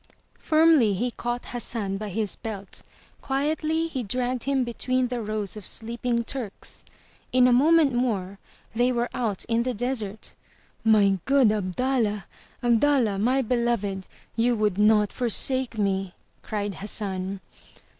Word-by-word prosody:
Firmly 310 Hz, -10 st, +4 dB
he 245 Hz, +6 st, -1 dB
caught 240 Hz, +1 st, -4 dB
Hassan 225 Hz, -5 st, -3 dB
by 210 Hz, +1 st, -5 dB
his 205 Hz, 0 st, -2 dB
belt; 205 Hz, -4 st, -8 dB, 0.4 s
quietly 310 Hz, +4 st, 0 dB
he 305 Hz, -6 st, -3 dB
dragged 245 Hz, +2 st, -2 dB
him 275 Hz, -2 st, +1 dB
between 250 Hz, +1 st, -1 dB
the 245 Hz, -1 st, -3 dB
rows 215 Hz, -2 st, -3 dB
of 210 Hz, -, -8 dB
sleeping 235 Hz, +2 st, -3 dB
Turks. 235 Hz, -5 st, -6 dB, 0.5 s
In 250 Hz, 0 st, +5 dB
a 250 Hz, -, +4 dB
moment 300 Hz, +2 st, +4 dB
more, 200 Hz, -6 st, -1 dB, 0.3 s
they 245 Hz, +2 st, +2 dB
were 240 Hz, 0 st, -1 dB
out 215 Hz, -6 st, -2 dB
in 230 Hz, 0 st, +1 dB
the 250 Hz, 0 st, -2 dB
desert. 220 Hz, -3 st, -3 dB, 0.5 s
'*My 205 Hz, -3 st, +4 dB
good 270 Hz, -5 st, +4 dB
Abdallah! 210 Hz, 0 st, -1 dB, 0.4 s
Abdallah, 240 Hz, -3 st, +3 dB
my 255 Hz, +5 st, +2 dB
beloved! 230 Hz, -5 st, -1 dB, 0.3 s
You 235 Hz, +1 st, +2 dB
would 210 Hz, -3 st, 0 dB
not 210 Hz, -1 st, +4 dB
forsake 255 Hz, 0 st, +3 dB
me!" 195 Hz, -3 st, -1 dB, 0.3 s
cried 205 Hz, -2 st, -3 dB
Hassan. 195 Hz, -2 st, -2 dB
235 Hz, 135 wpm, -25 LUFS, 205-255 Hz, 0.5 s, In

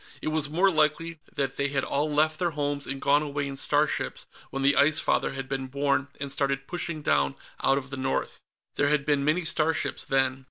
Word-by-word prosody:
It -, -, -2 dB
was 155 Hz, -2 st, 0 dB
more 185 Hz, +6 st, +3 dB
likely 155 Hz, +1 st, +1 dB, 0.2 s
that 135 Hz, -1 st, -1 dB
they 140 Hz, -, +1 dB
had 140 Hz, -1 st, -1 dB
all 150 Hz, +2 st, 0 dB
left 155 Hz, +1 st, +2 dB
their 175 Hz, -, +1 dB
homes 145 Hz, -1 st, -1 dB
and 135 Hz, +1 st, -4 dB
gone 145 Hz, +2 st, +3 dB
away 145 Hz, -1 st, -2 dB
in 135 Hz, -, -5 dB
starships 145 Hz, +2 st, 0 dB, 0.2 s
when 135 Hz, -, -3 dB
the 140 Hz, +1 st, +4 dB
Ice 145 Hz, +2 st, +4 dB
Father -, -, +1 dB
had 135 Hz, -1 st, -5 dB
been 135 Hz, -1 st, -3 dB
born 140 Hz, +1 st, 0 dB
and 140 Hz, 0 st, -3 dB
started 135 Hz, 0 st, 0 dB
pushing 170 Hz, -2 st, -4 dB
down 70 Hz, -, +2 dB, 0.3 s
out 135 Hz, -, +3 dB
of 135 Hz, -1 st, -5 dB
the 135 Hz, -, -4 dB
north. 130 Hz, 0 st, -2 dB, 0.4 s
There 145 Hz, -, +3 dB
had 145 Hz, -2 st, +1 dB
been 145 Hz, -2 st, +2 dB
many 155 Hz, +4 st, +1 dB
starships, 160 Hz, 0 st, 0 dB
then. 135 Hz, -1 st, +1 dB
145 Hz, 210 wpm, -27 LUFS, 135-155 Hz, 0.4 s, the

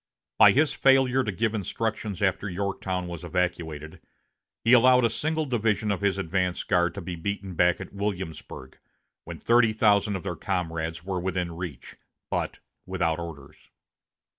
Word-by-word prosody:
By -, -, +8 dB
his 150 Hz, +3 st, +3 dB
failure 130 Hz, -1 st, +4 dB
to 105 Hz, -, -2 dB
give 110 Hz, +4 st, -1 dB
instructions 105 Hz, -1 st, -3 dB
after 100 Hz, +1 st, 0 dB
Yorktown 95 Hz, -1 st, -3 dB
was 85 Hz, -2 st, -7 dB
evacuated, 80 Hz, -4 st, -3 dB, 0.6 s
he 115 Hz, -, +4 dB
allowed 125 Hz, 0 st, +6 dB
a 115 Hz, -, +1 dB
single 155 Hz, +5 st, -1 dB
division 110 Hz, -4 st, 0 dB
of 100 Hz, -, -2 dB
his 100 Hz, -1 st, +1 dB
advance 90 Hz, 0 st, -1 dB
guard 90 Hz, -1 st, +1 dB
to 100 Hz, -, -5 dB
be 90 Hz, 0 st, -5 dB
beaten 95 Hz, +2 st, -4 dB
back 90 Hz, 0 st, +3 dB
at -, -, -9 dB
Williamsburg, 95 Hz, -9 st, -5 dB, 0.5 s
when -, -, -7 dB
thirty 115 Hz, -2 st, +3 dB
thousand 105 Hz, -1 st, +3 dB
of 95 Hz, -, -5 dB
their 95 Hz, -3 st, -3 dB
comrades 85 Hz, -3 st, -3 dB
were 95 Hz, -1 st, -2 dB
within 90 Hz, -2 st, -2 dB
reach, 85 Hz, -7 st, -7 dB, 0.3 s
but -, -, -2 dB, 0.3 s
without 85 Hz, -3 st, 0 dB
orders. 80 Hz, -5 st, -10 dB
95 Hz, 155 wpm, -26 LUFS, 85-110 Hz, 0.6 s, By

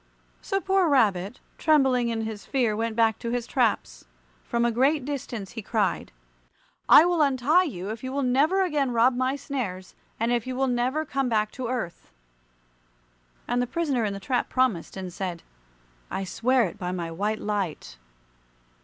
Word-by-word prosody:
So 390 Hz, -2 st, -1 dB
poor 385 Hz, -3 st, +2 dB
Rabbit, 210 Hz, -5 st, +2 dB, 0.2 s
trembling 265 Hz, -6 st, +3 dB
in 225 Hz, -1 st, -2 dB
his 220 Hz, -2 st, -5 dB
fear, 245 Hz, -6 st, 0 dB
went 225 Hz, 0 st, -2 dB
back 225 Hz, -1 st, +2 dB
to 235 Hz, -, -4 dB
his 240 Hz, 0 st, -2 dB
traps. 215 Hz, -, -1 dB, 0.4 s
From 235 Hz, 0 st, 0 dB
a 235 Hz, -, +2 dB
great 270 Hz, +4 st, +2 dB
distance 245 Hz, -8 st, -5 dB
he 225 Hz, -, -6 dB
cried, 210 Hz, -1 st, -1 dB, 0.8 s
"I 310 Hz, -, +9 dB
will 350 Hz, -2 st, +2 dB
untie 290 Hz, +6 st, +3 dB
you 195 Hz, -, -5 dB
if 220 Hz, +2 st, -7 dB
you 260 Hz, -, -4 dB
will 280 Hz, +1 st, -1 dB
never 295 Hz, +10 st, +3 dB
again 295 Hz, -7 st, 0 dB
rob 240 Hz, +2 st, +4 dB
my 255 Hz, +2 st, 0 dB
snares, 220 Hz, -11 st, -5 dB, 0.3 s
and 230 Hz, +2 st, +1 dB
if 240 Hz, 0 st, 0 dB
you 255 Hz, -, -3 dB
will 270 Hz, +1 st, +1 dB
never 255 Hz, +5 st, 0 dB
come 275 Hz, -2 st, -1 dB
back 215 Hz, -2 st, +1 dB
to 255 Hz, -3 st, -5 dB
earth." 235 Hz, -9 st, -4 dB, 1.4 s
And 245 Hz, +1 st, +1 dB
the 245 Hz, -, -1 dB
prisoner 280 Hz, -4 st, -1 dB
in 205 Hz, -2 st, -1 dB
the 195 Hz, -, -6 dB
trap 245 Hz, +5 st, -1 dB
promised, 250 Hz, -10 st, 0 dB
and 185 Hz, -2 st, -6 dB
said, 180 Hz, -3 st, -5 dB, 0.7 s
"I 195 Hz, -, -3 dB
swear 240 Hz, +7 st, +1 dB
it 200 Hz, +1 st, -4 dB
by 180 Hz, -2 st, -3 dB
my 170 Hz, -2 st, -4 dB
white 205 Hz, +6 st, -1 dB
light." 190 Hz, -, -3 dB
240 Hz, 175 wpm, -26 LUFS, 210-270 Hz, 1.4 s, I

